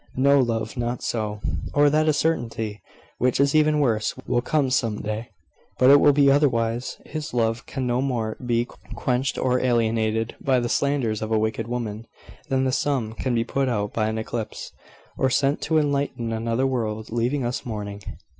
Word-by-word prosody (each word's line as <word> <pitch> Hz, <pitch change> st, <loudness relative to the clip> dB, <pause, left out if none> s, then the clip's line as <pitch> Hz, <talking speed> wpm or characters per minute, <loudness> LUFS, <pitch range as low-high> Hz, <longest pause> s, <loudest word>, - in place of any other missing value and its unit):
"No, 140 Hz, +2 st, +4 dB
love; 115 Hz, -2 st, -1 dB
not 120 Hz, 0 st, -2 dB
so." 105 Hz, -2 st, -2 dB, 0.3 s
"Or 145 Hz, 0 st, +5 dB
that 155 Hz, +1 st, +2 dB
a -, -, +5 dB
certainty 115 Hz, -9 st, -1 dB, 0.4 s
which 125 Hz, 0 st, +1 dB
is 140 Hz, 0 st, +3 dB
even 155 Hz, 0 st, +4 dB
worse 110 Hz, -7 st, +1 dB
will 120 Hz, 0 st, +1 dB
come 140 Hz, 0 st, 0 dB
some 115 Hz, -5 st, 0 dB
day. 110 Hz, +3 st, -4 dB, 0.5 s
But 130 Hz, +1 st, +6 dB
it 145 Hz, -, +8 dB
will 145 Hz, -, +6 dB
be 140 Hz, -1 st, +5 dB
otherwise. 120 Hz, -4 st, +1 dB
His 150 Hz, -4 st, -6 dB
love 115 Hz, +1 st, 0 dB
can 130 Hz, -2 st, -3 dB
no 125 Hz, +1 st, +1 dB
more 115 Hz, -5 st, -1 dB
be 120 Hz, -1 st, +1 dB, 0.3 s
quenched 130 Hz, +1 st, -1 dB
or 125 Hz, -1 st, +1 dB
alienated 115 Hz, -2 st, +1 dB
by 130 Hz, -2 st, +3 dB
the 120 Hz, -1 st, -2 dB
slanders 130 Hz, -7 st, 0 dB
of 110 Hz, 0 st, -4 dB
a 110 Hz, -, +3 dB
wicked 110 Hz, +1 st, -1 dB
woman, 115 Hz, -2 st, -4 dB, 0.4 s
than 130 Hz, -1 st, +1 dB
the 130 Hz, -, +1 dB
sun 130 Hz, -5 st, 0 dB
can 125 Hz, +1 st, -2 dB
be 115 Hz, -, +2 dB
put 135 Hz, +2 st, -1 dB
out 105 Hz, -3 st, -1 dB
by 110 Hz, -1 st, 0 dB
an 110 Hz, 0 st, -2 dB
eclipse, 110 Hz, 0 st, -5 dB, 0.5 s
or 130 Hz, -, +3 dB
sent 140 Hz, +2 st, +1 dB
to 160 Hz, -, +1 dB
enlighten 140 Hz, -6 st, 0 dB
another 115 Hz, +3 st, 0 dB
world, 110 Hz, -4 st, -2 dB
leaving 120 Hz, +4 st, 0 dB
us 120 Hz, +1 st, -2 dB
mourning." 105 Hz, -3 st, -5 dB
120 Hz, 185 wpm, -24 LUFS, 110-135 Hz, 0.5 s, it